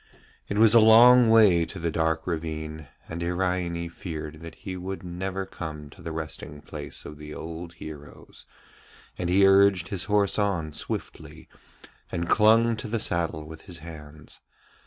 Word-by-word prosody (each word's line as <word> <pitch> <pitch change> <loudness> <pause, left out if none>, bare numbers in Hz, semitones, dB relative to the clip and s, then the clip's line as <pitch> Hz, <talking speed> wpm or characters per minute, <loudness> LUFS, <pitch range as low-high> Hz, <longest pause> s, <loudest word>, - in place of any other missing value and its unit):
It 100 - -2
was 110 0 +6
a 115 - +8
long 115 +2 +7
way 105 -7 +6
to 80 - -9
the 85 0 -2
dark 80 0 0
ravine, 80 -2 -5 0.2
and 80 +1 -6
Iraine 90 -1 -1
feared 80 -3 -7
that 85 0 -9
he 95 - -7
would 95 +1 -6
never 95 +2 -4
come 75 -5 -8
to 95 - -15
the 80 0 -6
resting 80 -2 -6
place - - -8
of 75 - -9
the 75 0 -9
old 85 +1 -7
heroes, 75 -3 -11 0.7
and 85 - -2
he 95 +2 +5
urged 95 -2 +4
his 95 -1 -3
horse 105 0 +2
on 90 -7 -1
swiftly, - - -6 0.6
and 85 0 -2
clung 115 +3 +4
to 110 - -6
the 115 +2 -1
saddle 85 -6 -1
with 80 0 -10
his 85 - -6
hands. 75 -2 -11
85 Hz, 160 wpm, -26 LUFS, 80-100 Hz, 0.7 s, a